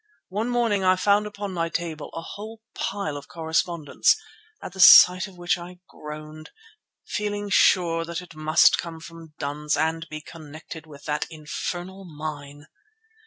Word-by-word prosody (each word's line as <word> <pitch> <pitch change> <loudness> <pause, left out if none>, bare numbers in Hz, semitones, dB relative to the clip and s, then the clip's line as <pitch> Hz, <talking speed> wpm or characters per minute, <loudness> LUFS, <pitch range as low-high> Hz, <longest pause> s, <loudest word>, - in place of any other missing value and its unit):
One 210 +6 -2
morning 230 -5 +1
I 185 0 +5
found 205 +3 +2
upon 205 -2 -6
my 165 -1 -1
table 165 -3 -4
a 165 - -5
whole 220 +5 -9
pile 190 -7 -3
of 145 - -10
correspondence, 160 -1 +1 0.4
at - - -9
the 190 - -11
sight 185 +1 +9
of 190 -2 -15
which 175 0 0
I 175 +1 -10
groaned, 155 +1 -10 0.6
feeling 205 -1 -3
sure 170 -3 +4
that 170 0 -4
it 180 -1 -12
must 155 0 +4
come 165 -1 -6
from 165 -1 -12
duns 150 +1 -2
and 165 +1 -1
be 155 - -6
connected 160 0 -11
with 145 -2 -13
that 150 0 -2
infernal 175 +4 -6
mine. 145 -3 -8
165 Hz, 155 wpm, -24 LUFS, 155-190 Hz, 0.6 s, sight